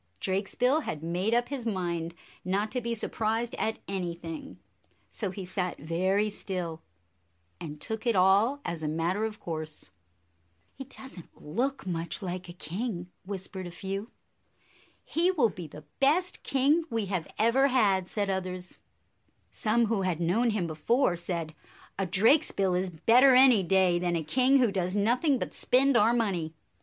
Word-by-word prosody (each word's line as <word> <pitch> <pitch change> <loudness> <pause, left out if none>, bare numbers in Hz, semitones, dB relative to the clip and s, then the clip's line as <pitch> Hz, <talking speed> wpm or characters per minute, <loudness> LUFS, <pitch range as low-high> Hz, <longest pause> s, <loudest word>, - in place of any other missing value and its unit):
Drakesbill 230 +10 +1
had 155 - -5
made 180 +7 0
up 240 0 +1
his 275 -4 -4
mind 170 -4 -2 0.3
not 200 +4 -1
to 250 - -2
be 235 0 -2
surprised 225 +1 -2
at 220 0 -1
anything, 170 - -5 0.5
so 205 - -3
he 185 0 -6
sat 180 -1 -2
very 185 +7 0
still, 180 -5 -5 0.8
and 150 -2 -7
took 220 +5 -4
it 230 - +3
all 200 +9 +4
as 170 -2 -4
a 155 - -2
matter 170 +7 0
of 215 -1 -5
course. 155 -2 -5 0.8
"He 270 - -8
does 265 -5 -12
n't 170 - -16
look 255 - -2
much 170 +1 -3
like 180 -1 -5
a - - -7
king," 180 +2 -5 0.2
whis 195 -2 -4
pered 185 -2 -7
a - - -6
few. 195 +5 -5 0.5
" - - -32
He 340 +3 +4
will 295 -12 +3
be 180 -5 -8
the 150 +1 -12
best 330 +7 +2
king 280 +5 +2
we 225 -4 -1
have 185 -4 -3
ever 240 +5 +4
had," 200 -8 +2
said 205 0 -2
others. 185 -1 -4 0.7
Some 230 +2 +1
who 220 -2 0
had 180 -4 -1
known 195 +8 +2
him 210 -5 0
before 175 - +1
said, 170 -2 -4 0.5
"A 195 - 0
Drakesbill 200 - +3
is 180 +1 0
better 240 - +5
any 255 -5 +7
day 185 -1 +3
than 175 -1 0
a 165 - -1
king 255 - +3
who 245 -5 +3
does 185 -1 -1
nothing 245 +8 +2
but - - -4
spend 270 +1 +3
our 225 0 +5
money." 185 -9 -1
195 Hz, 165 wpm, -28 LUFS, 175-235 Hz, 0.8 s, any